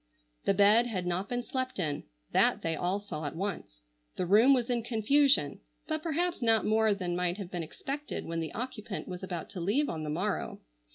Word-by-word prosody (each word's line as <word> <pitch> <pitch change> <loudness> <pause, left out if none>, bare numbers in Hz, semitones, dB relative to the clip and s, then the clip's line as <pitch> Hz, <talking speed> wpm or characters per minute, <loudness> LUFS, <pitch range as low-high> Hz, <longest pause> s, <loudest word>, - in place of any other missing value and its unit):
The 195 - +3
bed 210 +4 +6
had 190 -6 -3
not 180 +3 -1
been 245 0 -1
slept 255 +1 -3
in; 150 -6 -2 0.3
that - - +3
they 165 -1 0
all 180 +5 0
saw 160 -7 -6
at 145 - -4
once. 165 - -5 0.3
The 180 - -1
room 215 +9 +6
was 250 -3 +3
in 240 -1 0
confusion, 260 +5 +3 0.3
but 310 -1 -2
perhaps 340 +1 -1
not 225 -2 +3
more 220 -1 +3
than 180 -3 -2
might 180 +1 0
have 195 -3 -7
been 175 - -2
expected 275 - -5
when 165 0 -3
the 160 -1 -3
occupant 230 -4 -5
was 180 -1 -6
about 180 -3 -4
to 185 -3 -5
leave 235 - +1
on 160 - -3
the 155 - -4
morrow. 185 +6 -2
205 Hz, 205 wpm, -30 LUFS, 175-245 Hz, 0.3 s, bed